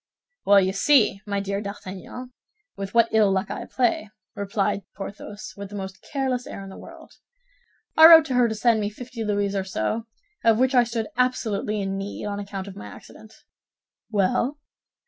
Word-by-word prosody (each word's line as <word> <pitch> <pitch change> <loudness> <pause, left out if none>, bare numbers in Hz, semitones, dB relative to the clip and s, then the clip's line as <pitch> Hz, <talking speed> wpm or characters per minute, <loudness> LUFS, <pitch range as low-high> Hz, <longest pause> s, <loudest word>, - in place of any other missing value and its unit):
"Well, 200 0 +7
you 190 0 +1
see, 210 -2 +3
my 200 -1 -1
dear 200 0 -3
D'Artagnan, 200 +5 -8 0.4
with 195 +2 -6
what 230 -1 +5
ill 215 -3 +4
luck 190 +1 -1
I - - -5
play," 235 -4 0 0.3
replied 200 0 -1
Porthos, 205 +1 -8
with 200 -1 -8
the 205 - -9
most 190 -1 -7
careless 260 -3 -1
air 195 - -7
in 195 - -9
the - - -11
world. - - -13 0.8
"I 320 0 +10
wrote 325 -1 +9
to 270 - -3
her 245 -1 +4
to 220 - -3
send 225 +1 +3
me 205 - -1
fifty 235 +2 -7
louis 205 -1 0
or 195 - 0
so, 190 - -3 0.4
of 225 -1 +5
which 260 +2 +2
I 245 -2 +5
stood 230 -2 -3
absolutely 220 -4 0
in 195 0 -3
need 200 +1 -6
on 205 -1 -3
account 200 -1 -6
of 195 - -9
my 105 - -9
accident." 215 - -13 0.8
"Well?" 220 +7 +1
205 Hz, 185 wpm, -24 LUFS, 195-235 Hz, 0.8 s, I